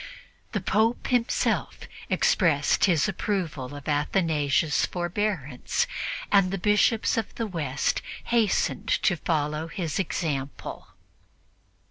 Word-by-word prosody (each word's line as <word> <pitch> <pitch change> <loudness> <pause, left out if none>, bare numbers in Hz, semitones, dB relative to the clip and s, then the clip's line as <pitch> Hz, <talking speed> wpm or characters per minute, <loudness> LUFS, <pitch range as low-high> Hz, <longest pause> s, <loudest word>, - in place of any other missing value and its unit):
The 210 - -1
Pope 220 +5 +1
himself 245 -2 0 0.3
expressed 150 -6 +3
his 170 -5 +3
approval 170 -9 -3
of 145 -1 -10
Athanasius' 150 0 +1
forbearance, 175 -7 -1 0.5
and 195 -2 +5
the 195 - -2
Bishops 210 +4 +2
of 225 - -3
the 230 - -2
West 150 -9 -1 0.2
hastened 230 -4 +1
to - - +2
follow 155 -1 -1
his 165 0 -3
example. 145 -7 -3
175 Hz, 100 wpm, -26 LUFS, 150-205 Hz, 0.5 s, and